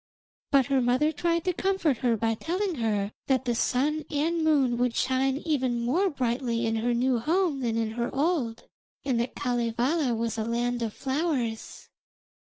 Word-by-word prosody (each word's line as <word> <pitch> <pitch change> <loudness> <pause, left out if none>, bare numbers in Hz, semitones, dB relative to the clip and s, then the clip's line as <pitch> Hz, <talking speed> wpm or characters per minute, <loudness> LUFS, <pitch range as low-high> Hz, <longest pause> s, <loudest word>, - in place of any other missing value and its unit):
But 275 -2 +4
her 270 0 +2
mother 255 +6 +2
tried 335 +2 0
to 365 - +1
comfort 370 -7 +1
her 235 -1 +1
by 225 +1 +1
telling 360 - -2
her 210 -3 0 0.2
that 265 -1 +1
the 240 - +1
sun 290 +6 0
and 320 +3 0
moon 275 -6 +3
would 245 -1 +1
shine 265 +1 +1
even 255 -6 0
more 355 +11 +2
brightly 240 -4 -1
in 225 0 0
her 240 +2 0
new 250 0 +2
home 325 +2 +1
than 230 -3 -1
in 225 -1 -1
her 235 +1 -2
old, 275 -6 -1 0.4
and 255 -4 +1
that 240 +2 -2
Kalevala 245 +3 0
was 230 0 -2
a - - 0
land 240 +1 -1
of 225 -2 -1
flowers. 265 -5 -2
255 Hz, 170 wpm, -27 LUFS, 235-300 Hz, 0.4 s, But